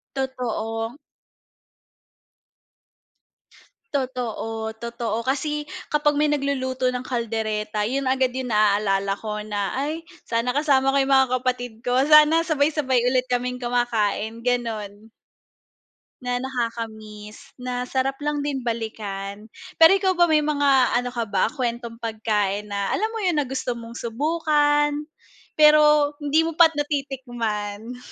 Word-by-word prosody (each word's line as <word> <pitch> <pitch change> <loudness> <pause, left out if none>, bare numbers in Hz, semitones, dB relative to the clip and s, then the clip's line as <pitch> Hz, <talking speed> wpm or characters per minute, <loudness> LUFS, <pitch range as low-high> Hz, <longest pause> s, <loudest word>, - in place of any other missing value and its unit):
Totoo. 240 -2 -3 3.0
Totoo, 225 -4 -3
totoo 235 0 -4
kasi 295 +3 -1 0.2
kapag 295 -1 +1
may 300 - +3
nagluluto 260 -3 0
ng 250 0 -5
kaldereta 215 -3 -2
yun 275 +3 -1
agad 260 -1 +1
yung 260 -2 -3
naalala 200 -2 +2
ko 210 0 -5
na, 205 -2 -2
"Ay 310 +4 -3 0.2
sana 230 +1 0
kasama 270 -1 +2
ko 280 - +1
yung 270 0 +3
mga 265 -1 +4
kapatid 245 -2 -2
ko 245 - +2
sana 305 +2 +6
sabay 295 -4 +2
sabay 280 -5 +1
ulit 255 0 +1
kaming 250 0 0
kumakain." 230 -2 -1
Ganon. 220 -4 -2 1.1
Na 245 0 -2
nakakamiss. 230 -1 -6
Na 250 0 -3
sarap 265 +1 -1
lang 295 -1 0
din 275 -3 -3
balikan. 210 -3 -4 0.3
Pero 325 +2 +8
ikaw 385 -1 +2
ba, 345 - +6
may 310 -2 +3
mga 285 -4 +3
ano 245 0 -1
ka 235 -1 -1
ba - - +2
kwentong 235 -3 -4
pagkain 210 -2 -1
na 200 -1 -1
alam 430 - 0
mo 450 - -3
yun 360 -5 +1
na 290 - +1
gusto 250 -2 -3
mong 230 0 -9
subukan. 295 +3 +1 0.5
Pero 300 -1 +6
hindi 295 +2 +3
mo 330 - -2
pa 335 -2 +8
natitikman. 245 -6 -3
250 Hz, 130 wpm, -23 LUFS, 225-290 Hz, 3.0 s, Pero